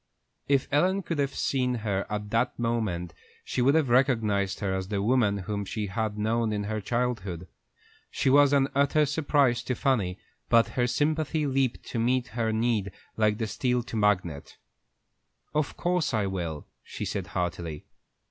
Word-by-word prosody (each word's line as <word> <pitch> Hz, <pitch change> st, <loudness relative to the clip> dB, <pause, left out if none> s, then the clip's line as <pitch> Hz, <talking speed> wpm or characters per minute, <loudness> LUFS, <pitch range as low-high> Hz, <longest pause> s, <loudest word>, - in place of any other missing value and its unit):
If 140 Hz, -2 st, +2 dB
Ellen 185 Hz, +7 st, +2 dB
could 165 Hz, -3 st, -3 dB
have 140 Hz, -1 st, 0 dB
seen 125 Hz, -2 st, 0 dB
her 100 Hz, -2 st, -1 dB
at 105 Hz, -1 st, -4 dB
that 120 Hz, +2 st, +1 dB
moment, 110 Hz, -8 st, -1 dB, 0.3 s
she -, -, -1 dB
would 140 Hz, +4 st, +4 dB
have 155 Hz, -5 st, +2 dB
recognized 115 Hz, -7 st, +2 dB
her 95 Hz, -3 st, -1 dB
as 95 Hz, 0 st, -2 dB
the 100 Hz, -1 st, -2 dB
woman 110 Hz, -1 st, +2 dB
whom 105 Hz, -1 st, -2 dB
she 105 Hz, +2 st, -3 dB
had 105 Hz, +2 st, -2 dB
known 110 Hz, +1 st, 0 dB
in 105 Hz, -1 st, -1 dB
her 110 Hz, +1 st, -3 dB
childhood. 105 Hz, -7 st, -2 dB, 0.6 s
She -, -, -2 dB
was 140 Hz, +1 st, +6 dB
an 140 Hz, -1 st, +4 dB
utter 140 Hz, +2 st, +3 dB
surprise 140 Hz, -4 st, +2 dB
to 125 Hz, -, -2 dB
Fanny, 105 Hz, -11 st, 0 dB, 0.3 s
but 115 Hz, -1 st, +5 dB
her 125 Hz, -1 st, 0 dB
sympathy 155 Hz, +3 st, 0 dB
leaped 135 Hz, -3 st, 0 dB
to 120 Hz, -, -2 dB
meet 125 Hz, +2 st, +1 dB
her 115 Hz, -1 st, -1 dB
need 110 Hz, -3 st, 0 dB, 0.2 s
like 105 Hz, -1 st, +2 dB
the 115 Hz, -, -1 dB
steel 125 Hz, +3 st, 0 dB
to -, -, -12 dB
the -, -, 0 dB
magnet. 90 Hz, -8 st, 0 dB, 1.0 s
"Of 150 Hz, -1 st, -1 dB
course 175 Hz, -7 st, 0 dB
I 105 Hz, -2 st, +1 dB
will," 85 Hz, -6 st, -4 dB, 0.2 s
she -, -, -6 dB
said, -, -, -3 dB
heartily. 85 Hz, -3 st, -3 dB
115 Hz, 170 wpm, -27 LUFS, 100-135 Hz, 1.0 s, was